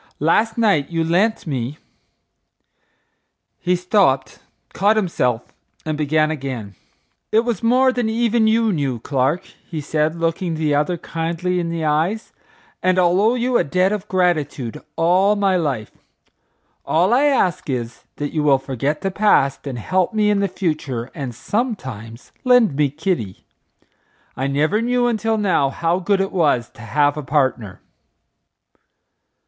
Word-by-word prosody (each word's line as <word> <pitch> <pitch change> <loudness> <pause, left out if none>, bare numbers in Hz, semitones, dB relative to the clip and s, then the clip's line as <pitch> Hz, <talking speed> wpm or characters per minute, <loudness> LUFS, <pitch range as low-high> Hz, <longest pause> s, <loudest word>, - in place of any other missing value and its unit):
Last 215 +10 +1
night 200 -12 +2
you 165 -1 -1
lent 195 +7 +1
me—" 135 -2 -3 1.8
He 180 0 +1
stopped, 180 -7 +1 0.3
caught 205 +3 +3
himself, 125 - -1 0.3
and 155 -1 -2
began 155 +1 +1
again. 130 -9 -5 0.6
"It 220 - +4
was 235 -5 -2
more 255 +3 +4
than 245 -3 -1
even 230 0 +2
you 225 -1 +2
knew, 140 -6 -1
Clark," 135 +7 0 0.3
he 160 - -4
said, 155 +2 -1
looking 165 +1 -1
the 155 -2 0
other 150 +5 +1
kindly 170 +3 -2
in 170 -1 -2
the 165 -1 -3
eyes, 160 +9 -1 0.5
"and 185 0 +2
I'll 180 +1 +3
owe 225 +4 +3
you 250 0 +1
a - - +2
debt 185 +6 +1
of 210 -1 -3
gratitude 155 - -1
all 185 +5 +3
my 200 -2 +2
life. 140 -11 -2 0.9
All 180 +7 +2
I 270 +4 +4
ask 190 - +1
is, 120 -2 -4
that 145 0 -4
you 155 - 0
will 145 -2 +4
forget 135 +3 -3
the 195 0 -1
past 165 -10 +2
and 130 -3 -4
help 185 - 0
me 210 -1 +3
in 205 - +1
the 200 - +1
future 155 - -3
and 135 -7 -6
sometimes 130 - -4
lend 245 - +4
me 145 0 +2
Kitty. 145 - -3 0.9
I 135 - -2
never 155 +10 +1
knew 245 +1 +1
until 225 -1 0
now 180 -9 +2
how 170 +5 -1
good 195 +2 +1
it 195 - -2
was 145 -9 +1
to - - -15
have 145 +5 +1
a - - -2
partner." 130 -8 -1
165 Hz, 150 wpm, -20 LUFS, 140-205 Hz, 1.8 s, It